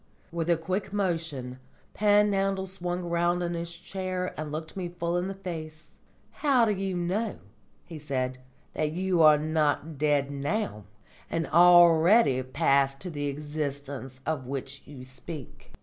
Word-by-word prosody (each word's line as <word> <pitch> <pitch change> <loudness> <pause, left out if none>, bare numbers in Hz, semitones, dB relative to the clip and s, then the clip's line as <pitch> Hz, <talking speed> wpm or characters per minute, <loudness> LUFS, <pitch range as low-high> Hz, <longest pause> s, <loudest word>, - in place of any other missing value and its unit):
With 170 0 -2
a 170 - +4
quick 185 +5 -3
motion 165 -10 -2 0.3
Panhandle 200 -2 +2
swung 180 -1 -3
round 175 +1 +1
in 175 0 -2
his 170 0 -4
chair 185 +1 -4
and 155 -1 -5
looked 160 +1 -6
me 180 -2 -3
full 170 0 -2
in 175 +1 0
the 195 - -5
face. 160 -5 -8 0.3
"How 270 -6 +3
do 215 - +1
you 195 -2 -2
know," 190 +5 -1 0.5
he 165 -3 -9
said, 130 -3 -2 0.3
"that 155 0 -1
you 180 0 +1
are 155 -1 +8
not 155 -1 0
dead 145 -2 +2
now, 140 - -2 0.4
and 165 0 -1
already 175 - +6
passed 135 +1 +1
to 180 - -6
the 145 -2 -3
existence 140 -2 -5
of 145 -5 -2
which 135 0 -5
you 135 -3 -10
speak?" 130 +2 -10
165 Hz, 150 wpm, -28 LUFS, 145-185 Hz, 0.5 s, are